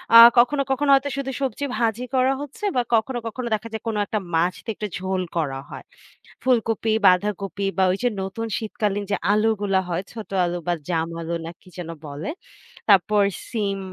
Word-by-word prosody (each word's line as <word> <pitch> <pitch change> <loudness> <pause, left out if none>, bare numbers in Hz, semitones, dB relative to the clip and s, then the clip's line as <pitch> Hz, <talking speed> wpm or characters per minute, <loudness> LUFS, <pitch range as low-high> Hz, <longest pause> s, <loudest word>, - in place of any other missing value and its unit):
আ - - +13 0.2
কখনো, 250 +4 +5
কখনো 280 +2 +1
হয়তো 275 +1 +3
শুধু 270 -1 -2
সবজি 270 +1 -1
ভাজি 230 +1 0
করা 260 +1 +3
হচ্ছে 290 - -9
বা 250 - +4
কখনো, 240 +3 0
কখনো 240 +2 -4
দেখা 215 +1 -2
যায় 220 - -3
কোন 225 - -1
একটা 215 - -1 0.2
মাছতে 175 +7 0
একটু 210 - -4
ঝোল 190 0 -1 0.2
করা 140 -5 -1
হয়। - - -8 0.6
ফুলকপি, 225 -3 +1
বাঁধাকপি 195 0 +1
বা 190 - +4
ওই 185 - -1
যে 245 - +4
নতুন 195 +4 -4
শীতকালীন 210 -2 -2
যে - - +3 0.2
আলুগুলা 205 -2 +2
হয়, 175 +1 -1
ছোট 220 -2 -8 0.2
আলু 175 0 -2
বা 175 - +3 0.2
জাম 165 -2 0
আলু 165 +1 -4
না 165 - -5
কি - - -22
যেন 175 -2 -6 0.2
বলে। 145 +1 -5 0.6
তাপ্পর 205 +1 +5 0.3
সিম, 205 -4 -1
210 Hz, 180 wpm, -23 LUFS, 185-240 Hz, 0.6 s, আ